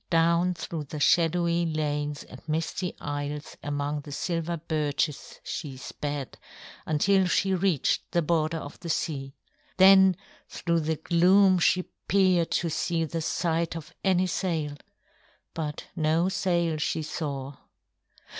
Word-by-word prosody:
Down 170 Hz, +1 st, +3 dB
through 160 Hz, -2 st, -5 dB
the 150 Hz, +2 st, -7 dB
shadowy 170 Hz, +2 st, +3 dB
lanes 150 Hz, -2 st, -2 dB
and -, -, -13 dB
misty 165 Hz, +3 st, -2 dB
isles 145 Hz, 0 st, -4 dB
among 145 Hz, 0 st, -2 dB
the 145 Hz, -, -10 dB
silver 170 Hz, +2 st, -2 dB
birches 150 Hz, -2 st, -2 dB
she 140 Hz, -5 st, -5 dB
sped, 145 Hz, +1 st, -5 dB, 0.5 s
until 190 Hz, +5 st, +3 dB
she 190 Hz, +2 st, +2 dB
reached 185 Hz, -5 st, +1 dB
the 170 Hz, -, +1 dB
border 160 Hz, 0 st, +1 dB
of 145 Hz, -2 st, -8 dB
the 170 Hz, -, -7 dB
sea. 135 Hz, -4 st, -2 dB, 0.4 s
Then 190 Hz, -1 st, +7 dB, 0.3 s
through 170 Hz, -1 st, 0 dB
the 160 Hz, 0 st, -1 dB
gloom 185 Hz, +4 st, +4 dB
she 180 Hz, +1 st, +3 dB, 0.2 s
peered 185 Hz, -3 st, +3 dB
to 170 Hz, -, 0 dB
see 165 Hz, +1 st, 0 dB
the 165 Hz, +1 st, -3 dB
sight 165 Hz, +1 st, -1 dB
of 160 Hz, -2 st, -8 dB
any 185 Hz, -1 st, +3 dB
sail; 165 Hz, -5 st, -2 dB, 0.8 s
but 150 Hz, -2 st, -4 dB
no 160 Hz, +3 st, +2 dB
sail 170 Hz, -4 st, 0 dB
she 155 Hz, +1 st, -1 dB
saw. 140 Hz, -3 st, -4 dB
165 Hz, 130 wpm, -27 LUFS, 150-175 Hz, 0.8 s, Then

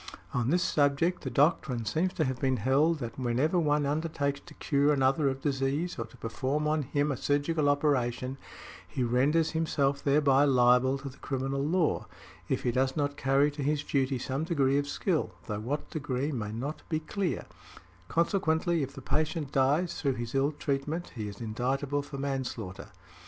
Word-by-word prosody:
On 120 Hz, 0 st, 0 dB
this 175 Hz, +4 st, +3 dB
subject 145 Hz, +5 st, +2 dB
the 130 Hz, -, -4 dB
doctrine 130 Hz, -3 st, +2 dB
seems 170 Hz, +10 st, 0 dB
to 160 Hz, -, 0 dB
have 130 Hz, -1 st, -3 dB
been 130 Hz, -1 st, +2 dB
held 140 Hz, +9 st, +3 dB
that 120 Hz, -2 st, -6 dB
whenever 130 Hz, +8 st, +1 dB
one 150 Hz, -2 st, +2 dB
undertakes 145 Hz, -1 st, -1 dB
to -, -, -12 dB
cure 145 Hz, 0 st, +2 dB
another 135 Hz, +1 st, +3 dB
of 135 Hz, 0 st, -5 dB
disease 140 Hz, +3 st, -1 dB
or 115 Hz, -, -2 dB
to 110 Hz, -, -17 dB
perform 130 Hz, +7 st, -2 dB
on 155 Hz, 0 st, +1 dB
him 145 Hz, +2 st, 0 dB
a -, -, -1 dB
surgical 145 Hz, +2 st, +1 dB
operation, 130 Hz, -3 st, 0 dB, 0.5 s
he 130 Hz, -, -2 dB
renders 140 Hz, +7 st, +2 dB
himself 140 Hz, -4 st, 0 dB
thereby 140 Hz, -1 st, +4 dB
liable 130 Hz, -1 st, +4 dB
to 140 Hz, 0 st, -7 dB
the 130 Hz, -, -16 dB
criminal 135 Hz, 0 st, -2 dB
law, 165 Hz, +2 st, +1 dB, 0.4 s
if -, -, 0 dB
he 120 Hz, -, +1 dB
does 130 Hz, +4 st, 0 dB
not 145 Hz, -1 st, 0 dB
carry 140 Hz, +1 st, +2 dB
to 145 Hz, 0 st, -6 dB
his 145 Hz, +1 st, 0 dB
duty 135 Hz, -2 st, 0 dB
some 135 Hz, +4 st, -2 dB
degree 140 Hz, -5 st, +2 dB
of 145 Hz, -, -2 dB
skill, 155 Hz, -, -1 dB
though 105 Hz, +1 st, -3 dB
what 135 Hz, +8 st, -4 dB
degree 140 Hz, -1 st, -2 dB
may 110 Hz, -6 st, -3 dB
not 135 Hz, +8 st, -4 dB
be 155 Hz, -2 st, 0 dB
clear; 180 Hz, +3 st, -2 dB, 0.6 s
consequently, 170 Hz, -, +1 dB
if 135 Hz, 0 st, -4 dB
the -, -, -9 dB
patient 155 Hz, -2 st, -1 dB
dies 145 Hz, +7 st, +1 dB
through 140 Hz, -3 st, +1 dB
his 120 Hz, -1 st, -5 dB
ill 135 Hz, +2 st, +2 dB
treatment, 150 Hz, +3 st, -3 dB
he 110 Hz, -4 st, -4 dB
is 100 Hz, -1 st, -8 dB
indictable 130 Hz, +5 st, -1 dB
for 140 Hz, 0 st, -8 dB
manslaughter. 130 Hz, -8 st, -4 dB
140 Hz, 180 wpm, -29 LUFS, 130-150 Hz, 0.6 s, thereby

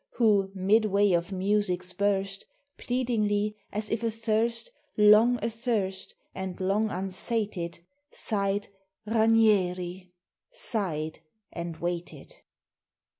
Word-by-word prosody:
Who, 210 Hz, -5 st, +3 dB
midway 200 Hz, +1 st, +3 dB
of 170 Hz, +2 st, +1 dB
music's 185 Hz, -2 st, 0 dB
burst, 195 Hz, 0 st, -1 dB, 0.3 s
Pleadingly, 215 Hz, -4 st, 0 dB, 0.2 s
as 210 Hz, +1 st, -2 dB
if 225 Hz, +1 st, -1 dB
athirst, 230 Hz, -, 0 dB, 0.3 s
Long 215 Hz, +4 st, +6 dB
athirst, 225 Hz, -5 st, -2 dB, 0.2 s
and 190 Hz, 0 st, -5 dB
long 200 Hz, +3 st, +1 dB
unsated, 190 Hz, -1 st, -3 dB, 0.3 s
Sighed: 200 Hz, -1 st, 0 dB, 0.4 s
"Ranieri!" 195 Hz, -5 st, +2 dB, 0.4 s
sighed 195 Hz, -, -2 dB, 0.3 s
and 170 Hz, -1 st, -5 dB
waited. 175 Hz, -, -5 dB
205 Hz, 85 wpm, -28 LUFS, 185-225 Hz, 0.4 s, Long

